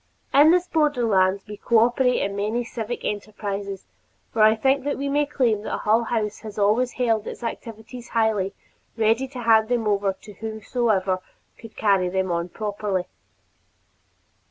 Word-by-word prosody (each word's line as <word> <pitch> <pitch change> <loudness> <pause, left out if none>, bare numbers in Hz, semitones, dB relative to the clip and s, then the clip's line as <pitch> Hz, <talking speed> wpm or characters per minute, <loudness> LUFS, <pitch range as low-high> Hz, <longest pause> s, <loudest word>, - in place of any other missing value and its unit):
In 290 +3 +7
this 360 +1 +3
borderland 225 - +2
we 210 0 -8
cooperate 240 +3 +3
in 200 0 -2
many 215 +4 -1
civic 230 0 -5
enterprises 200 -1 -4 0.5
for 225 - +1
I 215 +1 +6
think 265 +4 +1
we 280 0 -2
may 290 +1 +1
claim 235 -7 +1
that - - -3
Hull 225 +2 +2
House 215 -3 -2
has 215 -1 -9
always 215 +5 +2
held 225 -4 0
its - - -7
activities 230 +1 -7
lightly, 215 -4 +1 0.4
ready 225 +4 +2
to 255 -2 -8
hand 220 -1 +4
them 235 -3 0
over 200 -1 +1
to 210 +2 -14
whosoever 215 -2 -1 0.4
would 225 - -12
carry 195 -4 +2
them 190 0 -1
on 170 +1 -2
properly. 205 -2 -3
220 Hz, 150 wpm, -23 LUFS, 205-240 Hz, 0.5 s, In